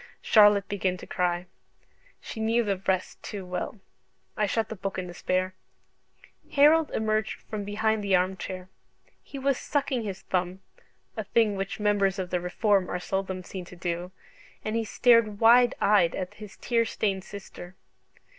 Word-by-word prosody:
Charlotte 205 -2 +6
began 190 -2 -1
to - - -10
cry: 175 0 -1 0.7
she 220 - -8
knew 225 +2 +2
the 200 -3 -1
rest 185 -1 -1
too 200 -3 -6
well. 180 +4 -4 0.6
I 210 - +1
shut 220 +2 0
the 220 - -5
book 195 -1 -4
in 185 - -3
despair. 185 +1 -2 1.0
Harold 300 +2 +5
emerged 215 -1 -1
from 210 -2 -5
behind 215 +1 0
the 195 -2 +3
arm 185 +1 +1
chair. 185 -1 -7 0.5
He 280 - -10
was 275 -1 0
sucking 275 -4 -1
his 195 -4 -5
thumb 185 +1 -2 0.5
(a 220 - -3
thing 210 0 +2
which 195 +2 -4
members 205 -2 +2
of 185 -2 -4
the 180 -1 0
Reform 195 +1 +1
are 180 - -2
seldom 190 0 -3
seen 185 0 -7
to 180 - -12
do), 175 0 -4 0.5
and 215 - -2
he 230 -1 0
stared 225 -2 +3
wide 240 +2 +6
eyed 200 -5 +4
at 185 +1 -4
his 210 -1 -11
tear 230 -1 +1
stained 200 -4 -2
sister. 190 -2 -10
200 Hz, 165 wpm, -27 LUFS, 185-220 Hz, 1.0 s, Charlotte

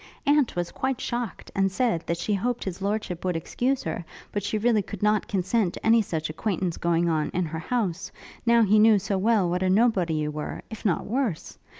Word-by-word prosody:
Aunt 285 -3 +3
was 175 -1 -2
quite 265 -1 -2
shocked, 240 -2 -4
and 195 -1 +1
said, 225 -5 +1
that 170 - 0
she 190 +5 -1
hoped 240 +5 -1
his 190 0 -5
lordship 200 -3 -2
would 180 -2 0
excuse 250 - -1
her, 165 +1 -3 0.3
but 205 - -2
she 205 +2 -1
really 220 0 +3
could 205 0 -8
not 210 0 +2
consent 190 0 0
to - - -9
any 225 +1 +6
such 160 -6 -3
acquaintance 175 +1 -2
going 170 0 +1
on, 155 -2 0
in 180 0 +1
her 160 0 -5
house, 190 -2 -2 0.3
now 235 -1 +5
he 210 +1 +4
knew 215 0 +6
so 195 +1 -2
well 210 -2 +3
what 180 +1 -1
a 185 - +2
nobody 190 -5 +3
you 150 -1 -1
were; 150 0 -5
if 220 - -8
not 190 -6 0
worse. 235 - -2
195 Hz, 215 wpm, -26 LUFS, 175-225 Hz, 0.3 s, any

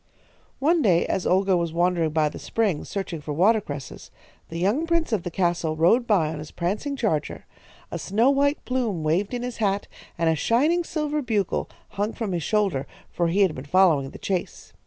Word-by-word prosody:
"One 320 +4 +2
day 180 - +3
as 190 - -1
Olga 190 +1 +3
was 170 -2 -1
wandering 175 -1 +1
by 155 0 +2
the - - -6
spring, 205 -9 -1
searching 190 -5 -4
for 150 0 -5
watercresses, 175 -6 0 0.4
the 165 - -6
young 210 - +1
prince 335 -6 +1
of 210 - +1
the 175 - -4
castle 170 -2 0
rode 205 +10 +3
by 180 -8 +3
on 155 -1 -5
his 150 0 -8
prancing 205 +11 -2
charger. 215 - -2 0.5
A - - -4
snow 225 +7 +2
white 285 +1 +1
plume 235 -10 -1
waved 170 +6 +1
in 245 -1 -3
his 250 -1 -5
hat, 200 -2 0 0.3
and 165 -1 +1
a 160 - +3
shining 290 - +2
silver 300 -2 -2
bugle 215 -7 -1 0.2
hung 205 +2 -2
from 220 -4 -3
his 175 -2 -1
shoulder, 195 -8 0 0.2
for 170 - 0
he 185 +5 +1
had 190 -5 +4
been 130 - -7
following 155 -5 +3
the - - -11
chase. 185 -3 -4
190 Hz, 195 wpm, -24 LUFS, 165-230 Hz, 0.5 s, had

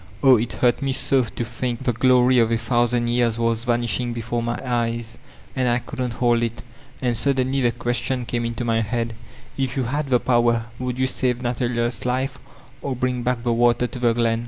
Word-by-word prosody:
Oh, 135 -2 +8
it 115 +2 -2
hurt 120 +3 +2
me 135 -1 0
so 135 0 +2
to 115 0 -4
think 120 +1 -4
the 125 - +1
glory 125 +1 +4
of 115 -1 +3
a 115 - +3
thousand 120 +1 +1
years 120 -1 +1
was 115 0 0
vanishing 120 0 0
before 120 +1 -3
my 120 0 -2
eyes 115 -2 -2 0.4
and 130 -1 +1
I 120 - +3
couldn't 125 -1 -4
hold 120 0 +2
it 115 0 -3 0.4
And 120 -2 +1
suddenly 135 +1 +1
the 120 -2 +3
question 120 +1 -2
came 120 0 -2
into 115 +1 -3
my 115 -1 +1
head: 115 +1 -2 0.5
'If 130 -1 -1
you 130 - +1
had 140 +4 -2
the 125 -2 +4
power 120 -2 +2
would 125 -1 -3
you 130 - +2
save 125 -1 0
Nathaniers 120 -1 -1
life 130 +2 -1 0.4
or 135 0 -3
bring 125 0 -1
back 120 -1 -1
the 120 -1 +1
water 120 +1 +3
to 125 - -6
the 120 -1 +3
glen? 115 -1 +1
120 Hz, 205 wpm, -22 LUFS, 115-125 Hz, 0.5 s, Oh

